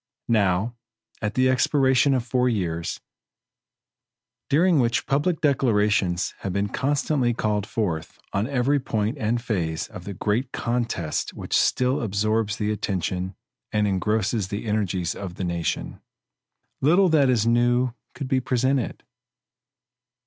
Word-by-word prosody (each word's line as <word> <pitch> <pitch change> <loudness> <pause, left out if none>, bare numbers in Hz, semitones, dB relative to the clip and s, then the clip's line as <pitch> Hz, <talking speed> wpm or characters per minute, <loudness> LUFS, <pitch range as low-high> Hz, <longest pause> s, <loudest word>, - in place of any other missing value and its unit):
Now, 100 +1 +2 0.5
at 105 -1 -2
the 130 0 +4
expiration 130 +1 +3
of 125 -2 -1
four 125 0 +2
years, 85 -7 -2 1.5
during 165 +2 +4
which 120 -2 +1
public 150 +5 0
declarations 105 - +2
have 95 - -3
been 100 +1 0
constantly 135 -2 0
called 105 -3 -1
forth 85 -8 -3 0.2
on 100 +3 0
every 140 +1 +1
point 110 +1 -2
and 115 +1 0
phase 85 -9 -2
of 95 -5 -10
the 100 - -6
great 115 +8 -1
contest 115 -9 -2
which - - -6
still 125 +1 +2
absorbs 110 0 0
the 105 0 -1
attention 95 -2 -2 0.4
and 105 -1 +2
engrosses 105 +1 0
the 100 +3 -5
energies 95 -5 -1
of 95 -3 -7
the 95 - -4
nation, 85 -2 -3 0.8
little 175 +7 +5
that 145 -5 +4
is 115 -4 +2
new 120 +1 +2 0.2
could 140 - -5
be 130 -1 +2
presented. 130 0 0
115 Hz, 130 wpm, -24 LUFS, 100-130 Hz, 1.5 s, little